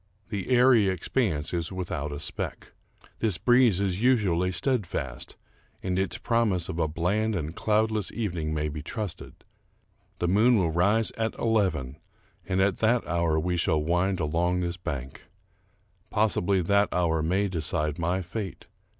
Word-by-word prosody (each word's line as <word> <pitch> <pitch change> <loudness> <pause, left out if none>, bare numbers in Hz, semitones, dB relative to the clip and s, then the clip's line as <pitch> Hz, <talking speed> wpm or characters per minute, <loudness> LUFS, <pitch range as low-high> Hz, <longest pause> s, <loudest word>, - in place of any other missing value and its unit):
The 100 -2 -4
airy 125 -4 +5
expanse 90 - -1
is 85 0 -2
without 85 -6 -4
a 70 - -5
speck. - - -5 0.5
This 105 -6 +1
breeze 120 -6 +4
is 95 -1 -1
usually 95 -8 +2
steadfast, 85 - -2 0.5
and 95 0 0
its 95 - -1
promise 110 -8 0
of 85 - -4
a 80 - +2
bland 100 +8 0
and 80 -1 -4
cloudless 110 -2 0
evening 85 -9 -3
may 75 -1 -1
be 75 0 -5
trusted. 100 +4 -6 0.7
The 90 - -1
moon 110 +6 +4
will 85 -5 +1
rise 100 +7 +2
at 110 0 -1
eleven, 95 - 0 0.5
and 95 0 0
at 95 -1 +2
that 115 +2 +2
hour 85 -2 +1
we 90 +2 -1
shall 80 -1 +2
wind 90 +3 +1
along 85 +3 0
this 85 0 -2
bank. 70 -7 -6 0.8
Possibly 100 -3 +1
that 100 +3 +3
hour 80 -3 +1
may 95 +6 +1
decide 75 -3 -2
my 90 +3 0
fate. 95 +2 -6
90 Hz, 150 wpm, -27 LUFS, 80-105 Hz, 0.8 s, airy